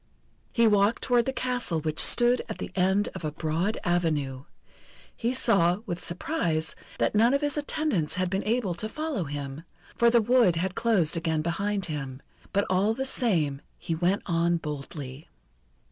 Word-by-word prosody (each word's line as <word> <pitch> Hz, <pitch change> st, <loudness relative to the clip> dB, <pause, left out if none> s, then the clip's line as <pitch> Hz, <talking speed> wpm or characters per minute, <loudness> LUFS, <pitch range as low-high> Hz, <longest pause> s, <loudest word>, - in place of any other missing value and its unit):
He 235 Hz, -1 st, +3 dB
walked 205 Hz, +1 st, +3 dB
toward 245 Hz, -2 st, +3 dB
the -, -, +1 dB
castle 250 Hz, -10 st, -1 dB
which 155 Hz, 0 st, -2 dB
stood 245 Hz, +1 st, +4 dB
at -, -, -5 dB
the -, -, -6 dB
end 190 Hz, +2 st, +2 dB
of -, -, -8 dB
a 155 Hz, -, -2 dB
broad 165 Hz, +7 st, -1 dB
avenue. 150 Hz, -7 st, -1 dB, 0.7 s
He 235 Hz, -, -1 dB
saw, 200 Hz, -7 st, +2 dB
with 175 Hz, -5 st, -4 dB
surprise, 170 Hz, -, -2 dB, 0.2 s
that -, -, +1 dB
none 230 Hz, +5 st, +4 dB
of 280 Hz, -, 0 dB
his 290 Hz, -1 st, -1 dB
attendants 295 Hz, -, -1 dB
had 185 Hz, 0 st, 0 dB
been 195 Hz, +2 st, -2 dB
able 220 Hz, -4 st, 0 dB
to 215 Hz, +6 st, -3 dB
follow 305 Hz, -, -3 dB
him, 140 Hz, 0 st, -5 dB, 0.3 s
for 235 Hz, 0 st, +4 dB
the 235 Hz, 0 st, +5 dB
wood 230 Hz, -5 st, +4 dB
had 180 Hz, +2 st, -1 dB
closed 185 Hz, -7 st, +2 dB
again 160 Hz, -2 st, -1 dB
behind 195 Hz, +4 st, -1 dB
him; 135 Hz, -4 st, -5 dB, 0.3 s
but 200 Hz, +1 st, +1 dB
all 195 Hz, +4 st, +2 dB
the 265 Hz, +2 st, -2 dB
same 160 Hz, -, 0 dB, 0.2 s
he 165 Hz, -, -4 dB
went 175 Hz, +5 st, 0 dB
on 170 Hz, -1 st, +1 dB
boldly. 145 Hz, -2 st, -7 dB
185 Hz, 170 wpm, -27 LUFS, 160-230 Hz, 0.7 s, the